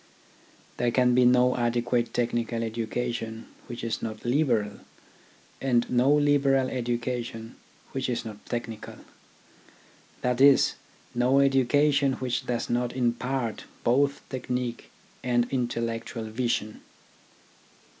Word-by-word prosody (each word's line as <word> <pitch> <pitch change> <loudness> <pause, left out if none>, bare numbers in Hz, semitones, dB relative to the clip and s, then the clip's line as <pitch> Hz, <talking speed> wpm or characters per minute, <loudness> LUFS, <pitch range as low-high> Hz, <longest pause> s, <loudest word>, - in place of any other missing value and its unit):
There 120 - +1
can 125 +1 +3
be 125 0 +5
no 125 0 +4
adequate 120 0 0
technical 120 -1 -1
education 115 0 -3 0.2
which 120 - -7
is 115 -1 -2
not 110 0 -6
liberal, 120 -6 +1 0.8
and 120 -3 +2
no 125 +3 +4
liberal 140 -3 +3
education 120 -1 -3 0.4
which 130 -1 -2
is 120 - -2
not 105 -2 -8
technical: 115 -2 -5 1.3
that 125 0 +1
is, 140 -1 +6 0.4
no 125 +3 +3
education 140 +1 +3
which 130 0 -3
does 120 -1 -1
not 120 0 -1
impart 125 -1 -1 0.2
both 140 +4 +1
technique 125 -2 -3 0.3
and 120 -1 +2
intellectual 115 -2 -2
vision. 115 -2 -2
120 Hz, 105 wpm, -27 LUFS, 115-130 Hz, 1.3 s, is